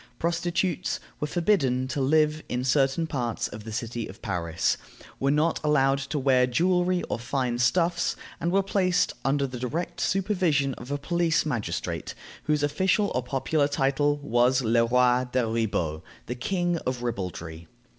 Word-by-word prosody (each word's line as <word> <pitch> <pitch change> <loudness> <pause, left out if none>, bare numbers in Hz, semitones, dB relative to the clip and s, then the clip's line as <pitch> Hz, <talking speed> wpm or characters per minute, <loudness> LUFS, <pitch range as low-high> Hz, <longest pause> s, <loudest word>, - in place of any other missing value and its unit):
Prostitutes 170 +1 -1 0.2
were 150 - -1
forbidden 145 -8 +1
to 135 +2 -2
live 155 +2 +3
in 125 +1 -1
certain 135 +4 +2
parts 125 -7 -2
of 105 +1 -9
the 110 - -6
city 115 0 -4
of 95 - -12
Paris, 85 -5 0 0.4
were 135 - +1
not 150 +3 +2
allowed 135 -2 +3
to 135 +2 -3
wear 130 -2 +3
jewelry 180 +6 +2
or 110 - -3
fine 120 0 -1
stuffs, 170 +7 +2 0.2
and 170 - -1
were 195 +1 +3
placed 185 -2 +1
under 140 +1 +1
the 125 -2 -6
direct 150 +8 -3
supervision 180 -8 +1
of 120 +1 -10
a 145 - -1
police 170 +2 +1
magistrate, 120 -8 -3 0.3
whose 150 -1 +1
official 190 +8 +1
or 125 - 0
popular 135 +4 0
title 145 +1 +1
was 125 0 +3
Le 115 +1 +3
roi 125 +1 +3
des 125 0 +2
ribauds 105 -9 -1 0.2
(the 125 - -3
king 175 +6 -1
of 125 -3 -3
ribaldry). 85 -7 -5
135 Hz, 155 wpm, -26 LUFS, 120-165 Hz, 0.4 s, live